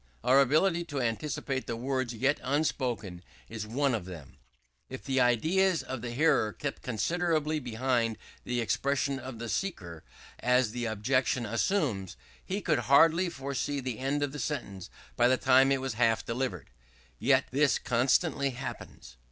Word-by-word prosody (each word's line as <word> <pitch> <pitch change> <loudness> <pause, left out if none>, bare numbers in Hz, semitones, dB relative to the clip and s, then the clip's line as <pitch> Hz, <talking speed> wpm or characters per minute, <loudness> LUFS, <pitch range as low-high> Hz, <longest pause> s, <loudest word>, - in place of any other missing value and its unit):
Our 135 +2 +5
ability 165 +6 +2
to 145 -4 -4
anticipate 130 +3 -2
the 115 - -2
words 130 0 -2
yet 130 +5 0
unspoken 125 - -2 0.2
is 110 -2 -6
one 135 +4 0
of 105 -6 -2
them 80 -8 -10 0.5
If 130 - -8
the 135 -1 0
ideas 165 +10 +2
of 130 -2 -6
the 120 - -4
hearer 135 -4 +2
kept 145 -1 -5
considerably 155 +4 0
behind 120 -2 -1 0.3
the, 125 -1 -1
expressions 140 +4 0
of 130 -1 -8
the 120 +1 -6
speaker, 90 - -4 0.4
as 125 -2 +2
the 120 +1 -3
objection 120 +3 0
assumes, 115 - -1 0.3
he 195 +2 -3
could 155 -5 +1
hardly 165 +5 +5
foresee 140 -1 -3
the 130 -4 -4
end 140 +2 -1
of 140 -1 -2
a 150 - -6
sentence 100 -5 -4 0.3
by 120 - +4
the 130 +1 +3
time 130 +1 +4
it 135 -1 +1
was 135 -2 -3
half 115 0 +1
delivered: 115 - -3 0.5
yet 130 +4 +3
this 140 -2 +3
constantly 140 +4 +1
happens. 120 - -8
130 Hz, 155 wpm, -29 LUFS, 115-145 Hz, 0.5 s, Our